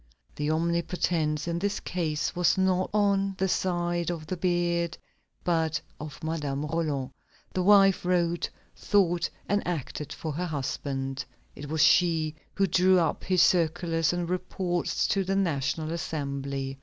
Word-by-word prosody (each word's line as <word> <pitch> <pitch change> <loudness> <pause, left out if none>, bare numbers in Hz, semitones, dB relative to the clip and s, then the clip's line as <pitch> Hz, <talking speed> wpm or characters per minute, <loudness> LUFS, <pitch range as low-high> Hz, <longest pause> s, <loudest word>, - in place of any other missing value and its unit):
The 150 0 -2
omnipotence 165 -1 0
in 170 0 -1
this 200 +2 -1
case 160 -3 -2
was 180 +1 +3
not 185 -1 +2
on 200 -2 +2
the 190 - +1
side 175 -2 0
of 165 -3 -4
the 185 - -3
beard, 175 -1 0 0.5
but 160 -3 +1 0.2
of 150 0 -8
Madame 150 -3 -2
Roland. 150 -4 -2 0.4
The 185 - 0
wife 195 0 +5
wrote, 175 -1 +1 0.3
thought, 175 -4 +2 0.2
and 205 0 +1
acted 150 -3 -4
for 160 - -4
her 175 +5 -2
husband. 135 -2 -3 0.3
It 145 0 -8
was 160 0 +2
she 160 -2 +4 0.2
who 195 - +3
drew 185 +1 +4
up 165 -3 0
his 185 -2 +4
circulars 165 -1 +2
and 175 -1 -2
reports 180 0 -1
to 195 - +2
the 195 +1 -1
National 160 -3 0
Assembly. 140 -4 -3
170 Hz, 145 wpm, -27 LUFS, 155-180 Hz, 0.5 s, wife